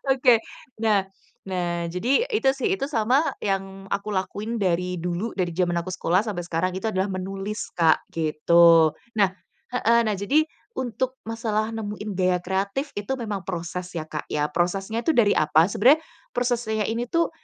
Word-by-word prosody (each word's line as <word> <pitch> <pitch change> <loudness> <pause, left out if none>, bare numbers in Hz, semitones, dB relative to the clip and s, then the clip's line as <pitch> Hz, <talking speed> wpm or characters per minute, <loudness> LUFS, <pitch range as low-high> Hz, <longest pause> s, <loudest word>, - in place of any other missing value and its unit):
Oke, 255 -3 +5 0.4
nah 210 -3 +3 0.4
nah, 175 -2 -2
jadi, 240 - +1
itu 425 - +2
sih, 275 +8 0
itu 330 - -3
sama 250 +2 +3 0.2
yang 195 -1 -3
aku 200 +2 -2
lakuin 205 +4 -2
dari 180 -1 0
dulu, 180 +6 -2
dari 175 -3 -2
zaman 175 -1 +1
aku 170 - -7
sekolah, 185 0 +2
sampai 185 -4 -3
sekarang 175 +2 -1
itu 190 +4 -2
adalah 190 -2 0
menulis 195 +2 -4
Kak, 160 -2 +4
gitu. 165 +1 +5 0.2
Nah 200 -3 +3 0.4
heeh 235 -1 +3
nah 215 -3 -1
jadi, 275 +11 +3 0.3
untuk 255 +1 -2
masalah 220 -1 -2
nemuin 210 -1 -5
gaya 180 -1 +3
kreatif, 200 +10 -2
itu 205 +6 -2
memang 210 -6 -4
proses 175 0 -4
ya 160 -2 -3
Kak 150 - -4
ya. 150 0 -1
Prosesnya 195 +7 -1
itu 325 - +3
dari 220 -4 +4
apa, 155 +4 +4
sebenarnya 270 +11 +5 0.3
proses 245 -1 +1
saya 220 0 0
ini 230 +2 -2
tuh, 335 0 +2
200 Hz, 165 wpm, -24 LUFS, 180-230 Hz, 0.4 s, Oke